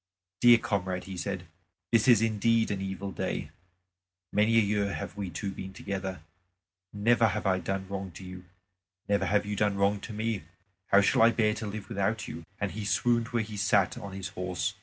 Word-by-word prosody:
"Dear 120 -1 +8
comrade," 95 -6 -2
he 95 - -7
said, 90 0 -4 0.5
"this 115 0 +4
is 115 -3 +6
indeed 115 0 +2
an 100 -1 -2
evil 95 0 -4
day. - - -3 0.8
Many 110 +2 +4
a - - +7
year 100 -1 0
have - - -6
we 100 -3 -4
two 95 +4 -4
been 95 0 -7
together. 95 -3 -4 0.7
Never 115 +3 +3
have 105 +1 -2
I 95 -1 +2
done 95 0 -3
wrong 95 0 -4
to 95 - -10
you; 90 0 -9 0.6
never 100 0 +1
have 105 0 +2
you 105 0 -3
done 105 0 +1
wrong 100 +1 +2
to - - -7
me. 110 -1 -2 0.5
How 100 - +6
shall 100 - +3
I 115 - +8
bear 110 -2 +2
to 110 0 -5
live 100 -1 -6
without 100 +3 -1
you?" 80 - -7 0.2
And 100 -2 -1
he 110 - -5
swooned 115 +3 +2
where 120 -2 0
he 105 -1 -8
sat 100 -1 +3
on 100 -1 -7
his 95 -1 -5
horse. 90 0 -2
100 Hz, 200 wpm, -29 LUFS, 95-110 Hz, 0.8 s, Dear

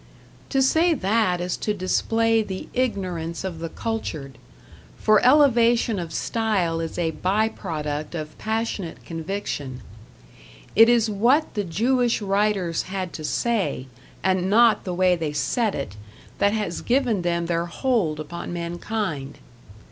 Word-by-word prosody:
To 270 -1 +2
say 320 +5 +3
that 200 -5 +1
is 180 0 -2
to 210 - -1
display 225 +4 +2
the 190 -3 -5
ignorance 185 -10 -2
of 180 -4 -5
the 165 0 -4
cultured; 155 - -5 0.6
for 215 -1 +4
elevation 240 -5 +4
of 170 -2 -5
style 190 -5 0
is 165 -1 -4
a 165 -2 0
by 200 +6 +1
product 155 -6 -4
of 155 -2 -6
passionate 220 -5 -3
conviction; 165 -6 -4 0.9
it 225 +2 +8
is 235 -2 +4
what 240 +9 +2
the 205 - -1
Jewish 235 +7 +1
writers 200 -4 0
had 185 -2 -4
to 155 - -7
say, 205 - -1 0.4
and 185 -1 +1
not 230 +2 +4
the 180 - -2
way 180 0 +4
they 160 -3 -3
said 195 - 0
it, 105 -8 -5 0.4
that 200 - +4
has 205 -6 -2
given 240 -6 +1
them 170 -1 0
their 170 0 -1
hold 180 - 0
upon 170 +4 -6
mankind. 170 -4 -4
190 Hz, 140 wpm, -24 LUFS, 165-225 Hz, 0.9 s, it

